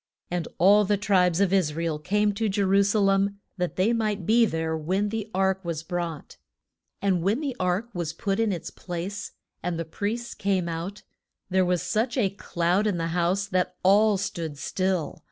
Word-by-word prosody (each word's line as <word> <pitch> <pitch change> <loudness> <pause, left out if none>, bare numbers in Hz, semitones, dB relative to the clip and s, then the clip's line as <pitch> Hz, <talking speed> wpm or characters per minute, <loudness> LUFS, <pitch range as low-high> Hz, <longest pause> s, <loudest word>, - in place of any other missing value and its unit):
And 175 -2 -2
all 205 +4 +6
the 205 +1 +1
tribes 185 -4 +2
of 195 -1 +2
Is 170 -6 +2
ra 165 +1 -2
el 155 -2 -1
came 205 +5 +1
to 215 +2 -1
Je 200 +1 0
ru 195 +1 +4
sa 200 +2 +2
lem, 200 0 +2 0.2
that 180 -1 -2
they 200 +6 +2
might 210 -5 -1
be 230 +3 +5
there 160 -2 -2
when 185 +6 0
the 220 0 -4
ark 190 0 +1
was 165 -2 -3
brought. 170 -3 -5 0.7
And 190 -3 +2
when 200 +8 +1
the 280 -5 -3
ark 185 +5 0
was 170 -4 -2
put 195 +5 -2
in 225 -2 +2
its 175 -4 -4
place, 185 +3 -5 0.3
and 175 -1 -2
the 165 - -3
priests 220 +8 -3
came 190 -3 0
out, 170 +5 -5 0.5
there 190 0 +4
was 180 -1 +1
such 235 +4 0
a 200 -7 +2
cloud 180 +1 0
in 200 -4 0
the 165 0 -1
house 180 +3 +1
that 185 -1 0
all 205 +2 +5
stood 165 -6 -4
still. 185 0 -1
190 Hz, 195 wpm, -26 LUFS, 175-205 Hz, 0.7 s, all